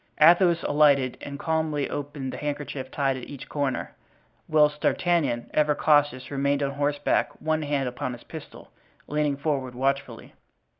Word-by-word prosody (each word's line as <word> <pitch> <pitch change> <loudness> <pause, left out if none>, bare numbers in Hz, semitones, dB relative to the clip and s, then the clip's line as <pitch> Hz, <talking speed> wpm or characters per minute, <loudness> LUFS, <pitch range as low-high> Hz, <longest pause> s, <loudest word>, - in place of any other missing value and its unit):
Athos 170 +2 +6
alighted 140 -4 +3
and 140 0 -6
calmly 155 -2 -1
opened 145 -2 -5
the - - -5
handkerchief 145 -2 -4
tied 135 -1 0
at 125 - -9
each 140 -3 -9
corner, 140 -4 -2 0.5
whilst 150 -1 +3
D'Artagnan, 165 -9 +1
ever 150 -1 +3
cautious, 145 -4 +2
remained 140 +1 +1
on 140 - 0
horseback, 145 +1 0
one 155 0 0
hand 145 -3 -1
upon 125 0 -4
his 120 - -11
pistol, 160 -2 -11 0.3
leaning 150 -1 0
forward 135 -4 -2
watchfully. 135 +2 -2
145 Hz, 145 wpm, -26 LUFS, 135-150 Hz, 0.5 s, Athos